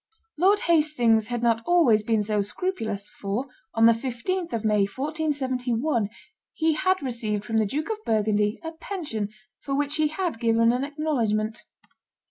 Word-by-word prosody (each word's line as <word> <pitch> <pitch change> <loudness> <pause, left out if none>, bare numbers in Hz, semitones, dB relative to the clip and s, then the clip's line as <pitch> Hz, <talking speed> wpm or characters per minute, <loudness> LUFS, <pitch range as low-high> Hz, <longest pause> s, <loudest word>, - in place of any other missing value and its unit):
Lord 390 +6 +3
Hastings 270 -10 +3
had 240 -1 -3
not 230 -1 +3
always 285 -10 +4
been 220 0 +1
so 210 0 0
scrupulous, 215 - -3
for, 205 +7 -4 0.3
on 225 0 +5
the 230 - +8
15th 270 +10 -3
of 225 -1 -2
May, 210 -2 +3
1471, 260 -3 -1 0.5
he 320 0 +2
had 370 +2 +1
received 220 -5 -2
from 225 0 -1
the 215 -1 +2
Duke 305 - -2
of 430 0 -5
Burgundy 210 - +1
a 325 - -4
pension 320 - -4 0.3
for 275 - -3
which 290 +2 0
he 310 -1 +3
had 320 -4 -3
given 230 0 +3
an 250 +2 -1
acknowledgment. 235 -8 -1
240 Hz, 155 wpm, -25 LUFS, 220-310 Hz, 0.5 s, the